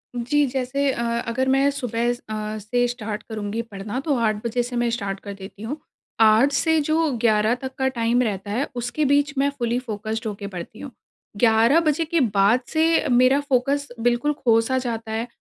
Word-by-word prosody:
जी। 285 +5 +1
जैसे 270 +2 -1
अ, 235 - -4 0.3
अगर 260 +3 -1
मैं 270 +1 +3
सुबह 240 -4 -2
अ, 215 -2 -5
से 245 +4 0
स्टार्ट 220 -3 -5
करुँगी 215 +1 -3
पढ़ना 210 +2 -6
तो 285 -1 0
8 220 -2 +1
बजे 245 +1 0
से 245 +1 -6
मैं 240 0 +1
स्टार्ट 200 -4 -3
कर 200 0 -8
देती 195 +1 -11
हूँ। 275 +8 -4 0.4
8 220 +6 +5
से 320 +2 +2
जो 315 0 +1
11 220 0 +3
तक 265 0 -5
का 265 0 +1
टाइम 240 -1 +1
रहता 200 -3 -3
है, 250 +7 -1
उसके 245 +5 -1
बीच 285 +1 +2
मैं 280 +1 +3
फुली 235 +1 0
फ़ोकस्ड 220 -2 -4
होके 200 -1 -5
पढ़ती 190 +3 -8
हूँ। 280 - -8 0.5
11 230 +6 +4
बजे 315 +2 +1
के 335 +1 0 0.2
बाद 200 +5 +4
से 325 +1 +3
मेरा 255 +3 +5
फ़ोकस 280 +1 0
बिल्कुल 245 +5 +1
खो-सा 235 -1 +2
जाता 230 -3 -3
है 225 +2 -2
240 Hz, 185 wpm, -23 LUFS, 220-275 Hz, 0.5 s, 8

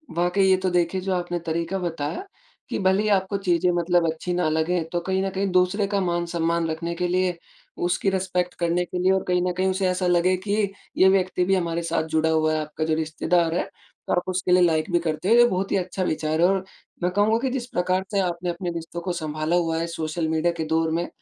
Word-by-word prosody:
वाक़ई 175 +3 +2
ये 190 - +5
तो 185 0 -1
देखिए, 180 +1 0
जो 190 0 -1
आपने 175 -1 -2
तरीका 170 +2 -2
बताया, 165 - -3 0.4
कि - - -2
भले 190 +1 +2
ही - - 0
आपको 195 0 +1
चीज़ें 180 -2 +1
मतलब 175 0 +2
अच्छी 165 +3 -4
ना 175 -2 +1
लगे 160 +2 0
तो 175 - 0
कहीं 190 +2 -1
न 195 - -1
कहीं 195 +1 0
दूसरे 185 +3 +2
का 200 0 0
मान-सम्मान 170 -1 0
रखने 165 +2 -3
के 180 +1 -1
लिए, 180 0 0 0.4
उसकी 180 +3 0
रिस्पेक्ट 180 -2 -1
करने 175 +1 +1
के 180 - -5
लिए 185 +1 +3
और 190 0 +1
कहीं 180 -1 +2
न - - +1
कहीं 190 +1 +1
उसे 190 0 0
ऐसा 180 0 0
लगे 175 +1 +3
कि, 200 +1 -1 0.3
ये 190 - +6
व्यक्ति 185 -1 +1
भी 195 +1 +3
हमारे 170 -2 -1
साथ 165 -1 0
जुड़ा 160 0 +2
हुआ 155 -1 +2
है, 155 - 0
आपका 155 +1 -4
जो 160 0 0
रिश्तेदार 160 +1 0
है। - - +1 0.4
तो - - +1
आप 180 - +1
उसके 185 0 -1
लिए 180 0 +6
लाइक 160 +1 +1
भी 175 - +3
करते 165 +2 -2
हो, 230 - +6
ये 240 - +8
बहुत 190 -2 -2
ही - - +3
अच्छा 185 0 -2
विचार 155 -1 -1
है 175 - +6
और 190 0 +1 0.4
मैं 180 - +1
कहूँगा 210 +3 +3
कि 265 +2 -1
जिस 250 -2 -3
प्रकार 185 +1 +1
से 200 - +1
आपने 175 -1 -1
अपने 175 +1 -3
रिश्तों 170 0 -6
को 180 +1 -3
सँभाला 155 0 -2
हुआ 165 -2 +1
है, 165 - -2
सोशल 160 0 -3
मीडिया 160 +2 +1
के 160 - -1
दौर 160 +1 +1
में, 170 +2 -1
175 Hz, 240 wpm, -24 LUFS, 165-185 Hz, 0.4 s, ये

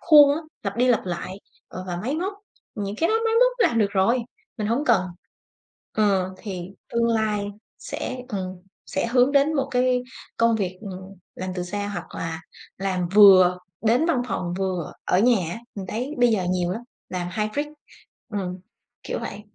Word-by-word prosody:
khuôn 295 -3 +8
á, - - -3 0.2
lặp 200 0 -3
đi 250 +2 +3
lặp 240 -5 +3
lại, 185 +2 -4 0.3
ờ, 185 - -7
và 175 -1 -3
máy 250 +11 -2
móc, 370 +5 -1 0.4
những 205 0 -4
cái 330 - +2
đó 440 - +2
máy 450 0 +2
móc - - +5 0.2
làm 230 - 0
được 200 -2 +3
rồi, 200 +6 +3 0.4
mình 210 - -1
hổng 240 +7 +1
cần. 225 -6 +4 0.9
Ờ, 195 -3 +1
thì 185 -3 -6 0.2
tương 235 0 +2
lai 215 -2 +1 0.3
sẽ 255 - -5
ừm, 185 -3 -4 0.3
sẽ 190 - -1
hướng 250 +3 +3
đến 285 +2 +4
một 275 -1 0
cái 250 0 +2 0.3
công 230 -1 +3
việc, 185 -3 -2
ừm, 190 -2 -8 0.2
làm 185 0 -4
từ 180 - -2
xa 205 +3 -3
hoặc 175 -4 -6
là 160 -1 -4 0.4
làm 185 -2 -1
vừa 185 -3 +8 0.2
đến 240 +9 +3
văn 260 -8 +2
phòng 175 -1 -2
vừa 185 -4 -2
ở 180 - +2
nhà 215 -7 +3
á, - - -5 0.2
mình 195 -2 -6
thấy 250 +9 -3
bây 245 0 +5
giờ 195 -5 +1
nhiều 180 -1 0
lắm, 230 - -5 0.3
làm 180 -1 -3
hybrid, 215 +8 -1 0.7
ừm, 185 -2 -3 0.4
kiểu - - -3
vậy. 205 - -6
205 Hz, 185 wpm, -24 LUFS, 185-245 Hz, 0.9 s, khuôn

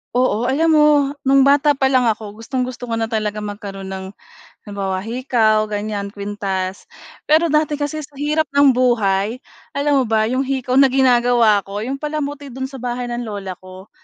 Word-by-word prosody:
Oo 245 -1 +1
alam 320 +4 +2
mo 300 -1 +5 0.4
nung 275 0 +4
bata 285 0 +4
pa 270 - +1
lang 260 -1 +3
ako 215 0 -5
gustong-gusto 250 0 -4
ko 230 - -1
na 225 - 0
talaga 215 -2 -2
magkaroon 200 -2 -7
ng 190 0 -6 0.6
halimbawa, 195 -2 -4
hikaw 225 -2 +1
ganyan, 205 -1 -4
kuwintas. 195 -2 -4 0.4
Pero 315 +2 +3
dati 305 0 +1
kasi 290 +1 -3
sa 295 - -29
hirap 300 +3 0
ng 285 -1 +6
buhay 235 -2 +1 0.3
alam 285 0 +2
mo 260 - +2
ba 220 -1 +2
'yong 265 +1 0
hikaw 260 -1 0
na 275 - +7
ginagawa 245 -4 +3
ko 205 +2 -5
'yong 270 +4 -4
palamuti 290 -1 -4
do'n 265 0 -5
sa 270 - -9
bahay 245 0 -4
ng 240 0 -4
lola 195 -4 -6
ko. 185 +2 -13
245 Hz, 175 wpm, -19 LUFS, 210-275 Hz, 0.6 s, na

